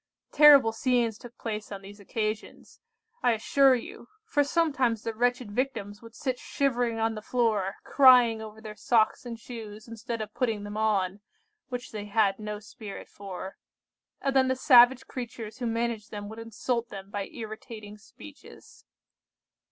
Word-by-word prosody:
Terrible 285 -6 +8
scenes 235 -1 0
took 245 -1 -13
place 215 -2 -5
on 200 -1 -7
these 205 +1 -12
occasions, 215 +1 -5 0.4
I 245 - +3
assure 265 +4 +4
you, 235 0 -8 0.2
for 295 -10 +2
sometimes 275 -7 +1
the 225 - -3
wretched 245 -1 0
Victims 205 -4 -3
would 230 -1 -14
sit 255 -3 -3
shivering 245 -4 0
on 225 0 0
the 215 - -7
floor, 215 -5 0
crying 250 -5 +6
over 220 0 -9
their 215 -1 -8
socks 225 +2 +1
and 230 -1 -6
shoes 220 -3 -9
instead 230 +1 -5
of 215 -1 -6
putting 225 -5 -1
them 205 0 -7
on, 205 -3 0 0.5
(which 245 -1 -5
they 210 -1 -6
had 205 -1 +1
no 210 0 -5
spirit 210 -1 -10
for,) 195 -1 -8 0.6
and 275 -1 -1
then 260 -1 +5
the 260 - +1
savage 255 -1 +6
creatures 235 -2 -7
who 245 - -2
managed 230 -2 -2
them 205 -1 -7
would 220 +1 -9
insult 230 +1 -3
them 195 0 -9
by 200 -1 -3
irritating 215 -2 -9
speeches. 105 - -15
225 Hz, 160 wpm, -28 LUFS, 210-245 Hz, 0.6 s, Terrible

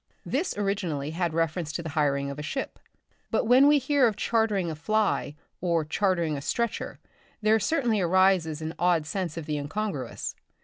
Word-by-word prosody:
This 300 - -1
originally 180 -8 -1
had 170 0 -1
reference 165 0 -1
to 170 - -3
the 160 - -5
hiring 140 -2 0
of 140 - -7
a - - -3
ship; 270 - -4 0.5
but - - +1
when 255 +5 +6
we 295 0 +6
hear 280 -1 +3
of 215 - -1
chartering 210 -5 +1
a - - -5
fly, 200 -2 0 0.3
or 170 -3 +1
chartering 170 -2 0
a 140 - -4
stretcher, 235 +10 -2 0.5
there 220 +1 +4
certainly 230 -3 +1
arises 175 -3 +3
an 160 +1 -4
odd 175 -3 +2
sense 170 0 -3
of 165 - -5
the 150 -1 -2
incongruous. 145 - -4
175 Hz, 175 wpm, -27 LUFS, 155-215 Hz, 0.5 s, when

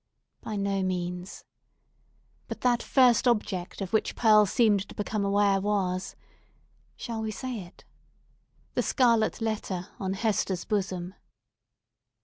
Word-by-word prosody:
By 215 - -5
no 200 -1 0
means! 180 0 -4 1.0
But - - -7
that 245 -1 +2
first 250 -2 +4
object 205 -6 -1
of 190 0 -5
which 220 - +1
Pearl 215 -3 +5
seemed 205 -3 +2
to - - -11
become 210 0 -2
aware 200 -1 +2
was—shall 200 +3 -5
we 220 - -2
say 245 +2 -5
it?—the 175 -2 -10
scarlet 230 -4 +2
letter 205 -5 -3
on 190 -1 -2
Hester's 195 -3 -1
bosom! 190 -3 -2
205 Hz, 115 wpm, -28 LUFS, 190-220 Hz, 1.0 s, Pearl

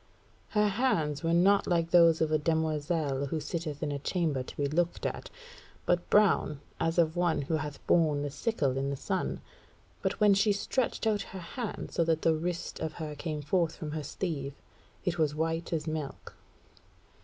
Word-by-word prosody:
Her 210 0 +5
hands 185 - +1
were 165 - 0
not 195 +4 +4
like 170 -1 +1
those 165 -2 +6
of 160 -1 +2
a 155 - +3
demoiselle 155 -2 0
who 155 +3 -2
sitteth 150 -1 -4
in 150 - -1
a 140 - -3
chamber 155 -3 0
to 130 - -9
be 145 - 0
looked 170 +4 0
at, - - -3 0.6
but 175 0 +1
brown 200 -8 +3 0.2
as 165 +1 0
of 165 -1 +3
one 175 -4 +1
who 150 - -3
hath 150 -1 -6
borne 155 -4 +3
the 145 - -3
sickle 140 - 0
in 135 +1 -1
the 140 - -1
sun. 190 +7 -2 0.6
But - - -1
when 210 -2 +6
she 200 +1 +3
stretched 235 +4 -1
out 215 -2 +2 0.2
her - - -5
hand 210 +6 -5
so 170 - +2
that 160 -1 +1
the 165 - +4
wrist 170 +2 -3
of 160 -1 -3
her 155 -3 -5
came 150 0 -4
forth 165 +1 +1
from 155 -2 -6
her 155 0 -3
sleeve 145 -2 -4 0.5
it 175 -2 -1
was 150 -2 +2
as - - -8
white 165 +2 -1
as 160 -2 -1
milk." 155 -3 -5
160 Hz, 190 wpm, -30 LUFS, 150-175 Hz, 0.6 s, those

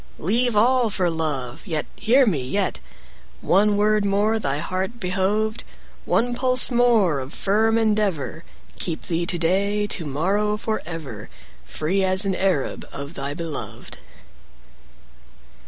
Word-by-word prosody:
25 - - -11
Leave 235 +4 +2
all 240 +2 +3
for 180 -4 0
love; 145 -7 -3
Yet, 155 -3 -1
hear 250 +5 +4
me, 170 - 0
yet, 185 +10 -1 0.6
One 205 +2 +3
word 210 0 +2
more 205 +3 +1
thy 140 -8 -1
heart 185 +8 -3
behoved, 200 +4 -1 0.4
One 245 +1 +1
pulse 255 +1 +4
more 230 - +3
of 130 +2 -7
firm 220 +3 +2
endeavour— 205 -8 0 0.4
Keep 165 -3 -2
thee 170 0 -2
to 175 - -1
day, 195 +5 +1
30 205 - 0
To 165 - -6
morrow, 200 +9 0
for 220 0 -2
ever, 140 -11 -7 0.4
Free 170 - -1
as 190 +1 +4
an 195 - +1
Arab 185 -8 -1
Of 140 +2 -7
thy 140 -1 -4
beloved. 165 -2 -7
195 Hz, 140 wpm, -23 LUFS, 165-215 Hz, 0.6 s, hear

